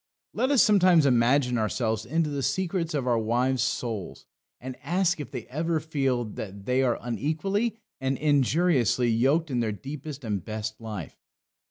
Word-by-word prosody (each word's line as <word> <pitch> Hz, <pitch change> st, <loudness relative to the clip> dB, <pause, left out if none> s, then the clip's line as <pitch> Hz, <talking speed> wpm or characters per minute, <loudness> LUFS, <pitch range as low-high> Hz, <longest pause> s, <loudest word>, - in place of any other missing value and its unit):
Let 260 Hz, -, 0 dB
us 280 Hz, -4 st, +5 dB
sometimes 185 Hz, -6 st, +5 dB
imagine 125 Hz, 0 st, +3 dB
ourselves 110 Hz, 0 st, -1 dB
into 155 Hz, +2 st, 0 dB
the 140 Hz, -1 st, -2 dB
secrets 165 Hz, +3 st, -1 dB
of 135 Hz, -3 st, -1 dB
our 120 Hz, -2 st, +2 dB
wives' 125 Hz, +4 st, +1 dB
souls, 110 Hz, -7 st, -3 dB, 0.3 s
and 130 Hz, 0 st, -7 dB
ask 175 Hz, +3 st, +1 dB
if 145 Hz, -, -6 dB
they 125 Hz, -4 st, -6 dB
ever 160 Hz, +4 st, -1 dB
feel 135 Hz, -6 st, -1 dB
that 100 Hz, -2 st, -8 dB
they 125 Hz, +2 st, +2 dB
are 125 Hz, -3 st, +1 dB
unequally 195 Hz, -, -1 dB, 0.2 s
and 135 Hz, 0 st, -1 dB
injuriously 145 Hz, -, +2 dB
yoked 140 Hz, +8 st, +2 dB
in 125 Hz, -, 0 dB
their 115 Hz, -2 st, 0 dB
deepest 140 Hz, +5 st, -7 dB
and 105 Hz, -5 st, -2 dB
best 110 Hz, +1 st, -5 dB
life. 105 Hz, -9 st, -7 dB
130 Hz, 160 wpm, -26 LUFS, 115-160 Hz, 0.3 s, us